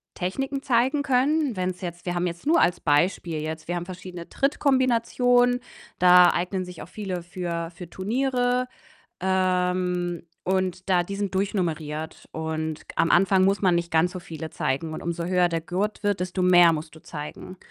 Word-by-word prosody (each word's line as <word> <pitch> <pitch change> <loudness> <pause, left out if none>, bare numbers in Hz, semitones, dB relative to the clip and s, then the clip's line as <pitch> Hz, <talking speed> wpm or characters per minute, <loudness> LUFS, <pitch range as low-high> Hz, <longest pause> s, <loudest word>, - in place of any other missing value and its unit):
Techniken 270 +10 -3
zeigen 260 +3 +2
können. 280 0 +2
Wenn's 185 -1 -3
jetzt 175 -1 -6
wir 175 -1 -2
haben 175 +1 0
jetzt 170 +5 -7
nur 325 +3 +4
als 175 0 +2
Beispiel 160 +1 +1
jetzt, 155 0 -5
wir 175 - -2
haben 175 0 -3
verschiedene 180 -1 -9
Trittkombinationen, 245 -3 +2 0.4
da 180 0 +8
eignen 185 +1 -2
sich 180 -2 -10
auch 165 - -13
viele 185 -4 -5
für 170 -1 -4
für 175 -2 -9
Turniere. 250 +5 0 0.5
Ähm, 180 -1 0 0.2
und 185 0 -1
da 180 -1 +4
die 200 +3 -5
sind 200 -2 -3
durchnummeriert 160 -5 -2
und 160 -1 -3
am 165 - +2
Anfang 190 +1 +4
muss 195 +2 +2
man 185 -3 +4
nicht 170 0 -1
ganz 165 +2 +2
so 185 - -5
viele 160 -2 -7
zeigen. 155 +5 -2
Und - - -6
umso 170 0 -3
höher 180 0 +2
der 165 -1 -2
Gurt 190 +5 -2
wird, 205 -3 0
desto 180 +1 -2
mehr 175 -1 +7
musst 155 +1 -6
du 160 - -14
zeigen. 150 +5 -8
180 Hz, 175 wpm, -25 LUFS, 170-200 Hz, 0.5 s, da